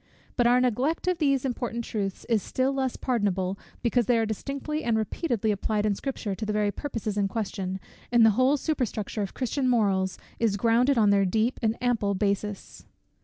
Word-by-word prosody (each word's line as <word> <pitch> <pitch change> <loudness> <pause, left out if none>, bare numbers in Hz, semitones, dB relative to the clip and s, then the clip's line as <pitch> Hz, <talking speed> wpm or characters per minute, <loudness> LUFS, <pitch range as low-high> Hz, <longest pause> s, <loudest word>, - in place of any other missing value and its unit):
But 240 -2 +3
our 245 +1 +5
neglect 255 +8 0
of 365 -2 +1
these 275 -4 +2
important 240 -2 -3
truths 195 -3 -3
is 225 -3 +2
still 260 +7 0
less 265 -2 -1
pardonable, 200 -6 -1 0.2
because 240 -1 +2
they 245 - +4
are 225 - +2
distinctly 280 +8 -4
and 230 -2 +1
repeatedly 220 - -1
applied 210 +1 -1
in 210 - +2
Scripture 220 -2 -4
to 205 - -6
the 215 - -1
very 210 -1 +1
purposes 225 -6 -4
in 200 - +2
question, 190 -3 -3 0.3
and 240 -2 +6
the 220 - +6
whole 255 +6 +3
superstructure 245 -8 -2
of 200 - -4
Christian 260 +1 0
morals 195 -6 +1 0.2
is 220 -3 +1
grounded 235 +5 +3
on 210 -3 +5
their 200 -1 +4
deep 220 +6 0
and 225 -1 +1
ample 220 -5 +1
basis. 200 +1 -3
225 Hz, 185 wpm, -27 LUFS, 205-255 Hz, 0.3 s, and